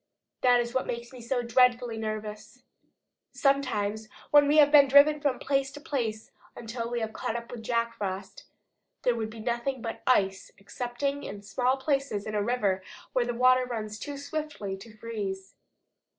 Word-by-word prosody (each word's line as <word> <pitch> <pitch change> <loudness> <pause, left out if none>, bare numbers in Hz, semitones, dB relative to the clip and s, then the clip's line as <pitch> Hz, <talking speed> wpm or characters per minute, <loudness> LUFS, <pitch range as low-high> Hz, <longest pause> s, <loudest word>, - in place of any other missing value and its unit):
That 245 -1 +5
is 240 0 -2
what 260 - 0
makes 235 +1 -5
me 250 - -10
so 245 +1 -1
dreadfully 245 0 +3
nervous. 215 +2 -6 0.7
Sometimes, 220 -6 0 0.2
when 290 -1 +7
we 295 +2 +3
had 295 -1 +7
been 285 -2 +8
driven 290 +2 +6
from 280 -4 +1
place 275 -1 0
to 290 - -8
place 235 -8 -3 0.2
until 230 0 -5
we 240 -1 -2
had 220 0 -3
caught 225 - -3
up 235 0 -5
with 240 - -7
Jack 230 0 0
Frost, 195 -3 -5 0.6
there 245 - +3
would 220 -2 -3
be 225 +1 -10
nothing 240 +3 -2
but 225 -1 -5
ice 195 -6 +2
excepting 245 +7 -3
in 200 -5 -7
small 250 +6 +1
places 275 -6 -1
in 215 - -5
a 210 - +1
river 205 -4 0 0.3
where 250 -2 +2
the 240 - -2
water 255 +1 +5
runs 215 -4 -5
too 285 +4 -6
swiftly 285 -8 -4
to 220 +4 -12
freeze. 200 -4 -5
235 Hz, 175 wpm, -28 LUFS, 215-265 Hz, 0.7 s, been